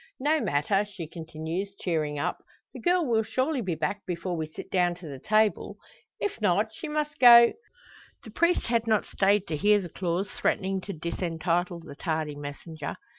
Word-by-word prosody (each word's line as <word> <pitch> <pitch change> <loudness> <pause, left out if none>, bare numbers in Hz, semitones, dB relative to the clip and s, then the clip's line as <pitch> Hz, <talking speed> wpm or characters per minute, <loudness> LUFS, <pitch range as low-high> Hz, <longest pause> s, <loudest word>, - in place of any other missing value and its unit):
"No 300 +4 +2
matter," 150 +8 +1
she 195 -5 -8
continues, 165 +4 -5
cheering 155 -4 -1
up, 145 - -2 0.3
"the - - -8
girl 355 -1 +2
will 230 -4 +2
surely 260 +5 -1
be 185 -6 -2
back 195 +6 -2
before 175 0 -3
we 160 -1 -3
sit 155 - -10
down 175 -2 +2
to 175 -1 -11
the 140 -3 -7
table. 215 +2 +1 0.4
If 405 - -3
not, 210 +2 +2
she 315 - -7
must 300 0 -2
go 235 -1 +9 0.4
" - - -24
The 220 - -11
priest 340 +9 +2
had 230 -1 0
not 215 -2 +2
stayed 200 0 +2
to 155 - -3
hear 205 +7 +4
the 180 -3 -6
clause 180 +3 -2
threatening 190 0 -1
to 200 - -3
disentitle 170 +1 -2
the - - -10
tardy 155 -2 -2
messenger. 145 +1 -7
190 Hz, 180 wpm, -27 LUFS, 165-220 Hz, 0.4 s, go